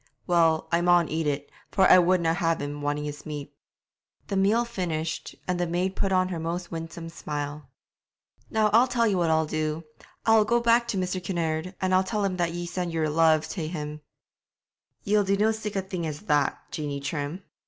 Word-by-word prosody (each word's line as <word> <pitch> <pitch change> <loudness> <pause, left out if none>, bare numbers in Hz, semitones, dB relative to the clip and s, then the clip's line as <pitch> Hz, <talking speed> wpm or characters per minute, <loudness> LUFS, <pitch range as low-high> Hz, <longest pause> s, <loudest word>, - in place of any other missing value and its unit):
Well, 165 -3 +3
I 170 0 +3
maun 175 -1 +4
eat 160 0 -1
it, 145 0 -2 0.2
for 190 -1 +4
I 185 - +8
wouldna 175 -2 +3
have 165 -1 0
him 145 0 -5
wanting 145 0 -1
his 150 0 -6
meat.' 145 -2 -7 0.8
The 200 - -1
meal 210 +5 +3
finished, 170 -8 -3
the 175 -1 0
maid 180 +3 -1
put 195 - 0
on 185 0 +2
her 175 -3 -3
most 170 +2 -4
winsome 165 0 -6
smile. 145 -3 -5 0.8
'Now 220 -1 +2
and 210 - +2
I'll 240 +3 +6
tell 235 -2 +1
ye 215 - +2
what 175 -3 +1
I'll 160 0 +3
do; 155 +1 -2 0.4
I'll 225 -1 +6
go 235 +3 +2
back 235 0 +3
to 225 -4 -2
Mr. 185 0 -2
Kinnaird, 170 0 -2
and 185 0 0
I'll 185 +1 +5
tell 210 +1 -1
him 190 -2 -1
ye 175 0 -1
sent 175 0 -3
yer 160 -2 0
love 160 0 +3
tae 165 -5 -4
him.' 150 -2 -5 1.0
'Ye'll 205 +1 +3
no 200 0 +1
do 215 +2 +2
sic 215 -1 -5
a 195 - 0
thing 185 -3 -4
as 150 -1 -5
that, 150 -7 +1
Jeanie 145 -2 -3
Trim!' 145 +5 -4
170 Hz, 195 wpm, -26 LUFS, 155-190 Hz, 1.0 s, I